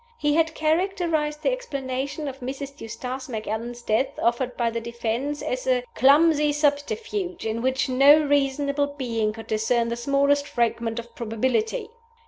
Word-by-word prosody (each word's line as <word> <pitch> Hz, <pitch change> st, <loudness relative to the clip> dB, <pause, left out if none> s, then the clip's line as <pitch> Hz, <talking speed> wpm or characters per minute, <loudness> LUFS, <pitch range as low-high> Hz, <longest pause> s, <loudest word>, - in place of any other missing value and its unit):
He 295 Hz, -5 st, +1 dB
had 320 Hz, 0 st, +2 dB
characterized 315 Hz, -2 st, 0 dB
the -, -, +3 dB
explanation 280 Hz, -, -4 dB
of 270 Hz, -1 st, -6 dB
Mrs. 275 Hz, +2 st, -6 dB
Eustace 250 Hz, +4 st, -6 dB
Macallan's 230 Hz, +1 st, -4 dB
death 225 Hz, +5 st, 0 dB
offered 245 Hz, +1 st, 0 dB
by 235 Hz, -1 st, +1 dB
the 230 Hz, 0 st, -3 dB
defense 235 Hz, +5 st, -3 dB
as 255 Hz, +1 st, -3 dB
a 250 Hz, -1 st, +2 dB
"clumsy 300 Hz, +2 st, +5 dB
subterfuge, 350 Hz, -, -1 dB
in 225 Hz, +1 st, -2 dB
which 260 Hz, +1 st, +1 dB
no 275 Hz, +4 st, +6 dB
reasonable 285 Hz, 0 st, +1 dB
being 230 Hz, -5 st, -1 dB
could 225 Hz, 0 st, -9 dB
discern 230 Hz, +2 st, +1 dB
the 235 Hz, -, -1 dB
smallest 280 Hz, +3 st, +2 dB
fragment 230 Hz, -2 st, -1 dB
of 235 Hz, 0 st, -7 dB
probability." 260 Hz, -, -1 dB
270 Hz, 145 wpm, -24 LUFS, 235-295 Hz, -, no